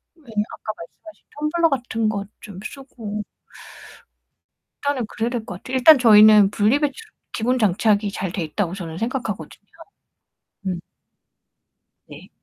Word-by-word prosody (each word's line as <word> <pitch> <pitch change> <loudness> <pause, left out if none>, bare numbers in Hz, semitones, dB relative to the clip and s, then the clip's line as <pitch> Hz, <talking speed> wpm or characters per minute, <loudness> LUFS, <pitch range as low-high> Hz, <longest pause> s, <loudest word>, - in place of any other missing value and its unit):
네 325 - -25 0.2
아까 215 - -7
말씀하신 315 - -14 0.3
텀블러 340 0 +3
같은 235 -5 -1
거 200 -2 -3 0.2
좀 200 -3 -10
쓰고 225 -6 -7 1.6
일단은 280 -5 0
그래야 230 +2 -2
될 240 -3 -3
것 180 - -7
같아요. 260 - -3
일단 285 +4 +8
저희는 215 -3 +7
분리 215 +6 +2
배출 300 +10 -3 0.2
기본 250 +3 0
장착이 210 0 +2
잘 190 -3 -4
돼 185 - -3
있다고 175 +3 -2
저는 170 -4 -7
생각하거든요. 225 - -4 1.1
음. 180 -2 -2 1.3
네. - - -13
220 Hz, 270 characters per minute, -22 LUFS, 200-260 Hz, 1.6 s, 일단